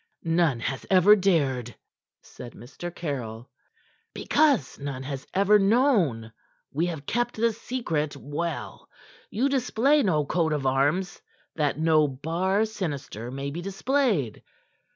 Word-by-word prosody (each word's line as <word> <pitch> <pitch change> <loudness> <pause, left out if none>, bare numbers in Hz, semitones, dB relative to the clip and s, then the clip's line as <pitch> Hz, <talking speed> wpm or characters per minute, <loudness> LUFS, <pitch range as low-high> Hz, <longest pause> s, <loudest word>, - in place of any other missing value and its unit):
"None 165 -6 +2
has 135 +2 -3
ever 190 +2 +7
dared," 140 - 0 0.5
said 120 -1 -11
Mr. 140 +9 -8
Caryll. 125 -7 -5 0.6
"Because 280 - +2
none 140 -2 -5
has 135 0 -6
ever 200 +2 +4
known. 195 - +2 0.4
We 165 +5 0
have 160 -5 -5
kept 240 +5 -1
the 230 +1 +1
secret 165 - -3
well. 150 +3 -5 0.4
You 245 +6 0
display 275 +2 +2
no 155 - +1
coat 160 +1 0
of 145 -3 -2
arms 145 +8 0 0.3
that 150 -3 0
no 155 -1 +3
bar 170 +10 0
sinister 145 - -5
may 140 +2 -5
be 170 +4 -5
displayed. 195 - 0
165 Hz, 125 wpm, -26 LUFS, 140-205 Hz, 0.6 s, ever